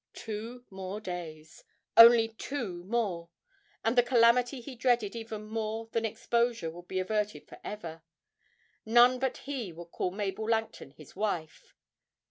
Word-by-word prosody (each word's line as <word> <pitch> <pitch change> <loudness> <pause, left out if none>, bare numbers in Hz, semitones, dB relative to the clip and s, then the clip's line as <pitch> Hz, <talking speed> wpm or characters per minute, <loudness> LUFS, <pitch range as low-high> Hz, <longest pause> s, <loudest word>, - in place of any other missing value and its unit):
Two 230 +3 -7
more 190 +1 -6
days 165 -5 -8 0.3
only 230 -1 +9
two 225 -6 -5
more 190 -6 -2 0.6
and 225 +2 +2
the 245 - +7
calamity 245 +1 +3
he 250 +3 -9
dreaded 235 -4 +1
even 225 -2 -6
more 220 +1 -4
than 230 0 0
exposure 235 -4 0
would 175 +2 -12
be 190 - -4
averted 210 +2 -2
for - - -13
ever 165 -6 -7 0.8
none 240 +3 +5
but 265 -1 -1
he 260 -9 -4
would 170 +1 -11
call - - -1
Mabel 205 +3 -3
Langton 225 -10 -1
his 150 +1 -16
wife! 185 -6 -4
220 Hz, 140 wpm, -30 LUFS, 185-235 Hz, 0.8 s, only